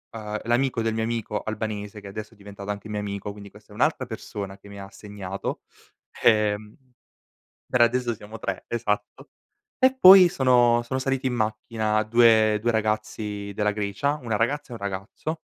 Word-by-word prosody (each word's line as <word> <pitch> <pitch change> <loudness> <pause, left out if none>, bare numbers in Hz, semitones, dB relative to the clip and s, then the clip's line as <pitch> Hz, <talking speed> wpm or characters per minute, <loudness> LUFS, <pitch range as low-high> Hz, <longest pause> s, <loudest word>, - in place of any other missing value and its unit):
ehm, 105 -1 -4
l'amico 120 0 +1
del 110 0 0
mio 110 - -1
amico 115 -2 -3
albanese, 105 -1 -4
che 100 - -11
adesso 110 +3 -8
è - - -27
diventato 100 0 -10
anche 105 +1 -7
mio 105 -1 -3
amico, 100 0 -5
quindi 100 -1 -11
questa 105 0 -17
è - - -13
un'altra 130 +2 +1
persona 100 -4 -7
che 100 - -16
mi 100 0 -10
ha 100 0 -9
segnato, 100 -1 -6 0.6
ehm 105 -1 +2 1.0
per 125 - 0
adesso 120 0 +2
siamo 105 +1 -11
3 - - -4
esatto. 105 -3 -3 0.5
E 260 0 +4
poi 185 -5 +9
sono 125 -5 +3
sono 130 +2 -2
saliti 135 0 -1
in 125 - 0
macchina 110 -1 -1
2- 110 -1 +5
2 120 - +2
ragazzi 105 -2 -2
della 105 +1 +1
Grecia, 105 +7 -1
una 115 -3 -1
ragazza 140 +6 -1
e - - -9
un - - -7
ragazzo, 100 +11 -5
110 Hz, 175 wpm, -25 LUFS, 105-120 Hz, 1.0 s, poi